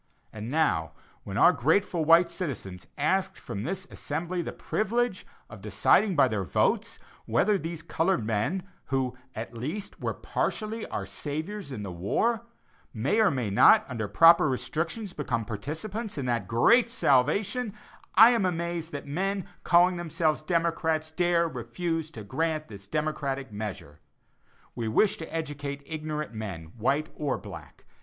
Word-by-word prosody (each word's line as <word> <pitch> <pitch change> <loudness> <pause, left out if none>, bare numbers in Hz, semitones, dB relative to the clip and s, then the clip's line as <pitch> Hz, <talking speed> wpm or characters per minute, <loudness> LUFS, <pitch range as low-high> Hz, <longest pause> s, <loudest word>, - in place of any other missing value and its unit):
And 110 +1 -6
now, 125 - +1 0.3
when - - -5
our - - +7
grateful 165 - +1
white 170 +2 +6
citizens 110 - -5
ask - - +1
from 100 - -6
this 190 - -4
assembly 170 +4 -3
the - - -4
privilege 235 -1 -1 0.2
of 110 -3 -11
deciding 140 - +3
by 140 -3 +5
their 110 -5 -1
votes 85 - 0 0.3
whether 180 - +3
these 165 -3 -4
colored 165 - 0
men, 115 - -1 0.2
who, 130 -2 -1 0.2
at 115 +2 -6
least, 155 - -5
were - - -2
partially 220 +1 -2
our - - -4
saviors 155 +3 -5
in 110 -5 -5
the 95 - -5
war, 155 - 0 0.5
may 135 - 0
or 220 -3 +5
may 125 -7 -2
not, 215 - +6
under 115 -5 -3
proper 165 - +6
restrictions, 165 - -3
become 115 -6 -2
participants 160 - -5
in 140 - -2
that 120 -6 -1
great 230 - +4
salvation, 210 - +2 0.4
I 225 +2 +9
am 235 -5 +2
amazed 170 -2 -2
that 145 - -5
men 190 +6 -2 0.2
calling 180 +1 +4
themselves 165 -2 0
democrats 160 -1 0
dare 170 0 +2
refuse 160 +5 -3
to 110 - -8
grant 155 +8 -2
this 100 -2 -10
democratic 140 -2 -2
measure. 100 -8 -6 0.7
We 115 -2 -3
wish 195 - +3
to 160 - -8
educate 145 -3 -4
ignorant 150 -3 -4
men, 95 -7 -6
white 135 +7 0
or 145 -3 -1
black. - - -11
155 Hz, 150 wpm, -28 LUFS, 120-180 Hz, 0.7 s, I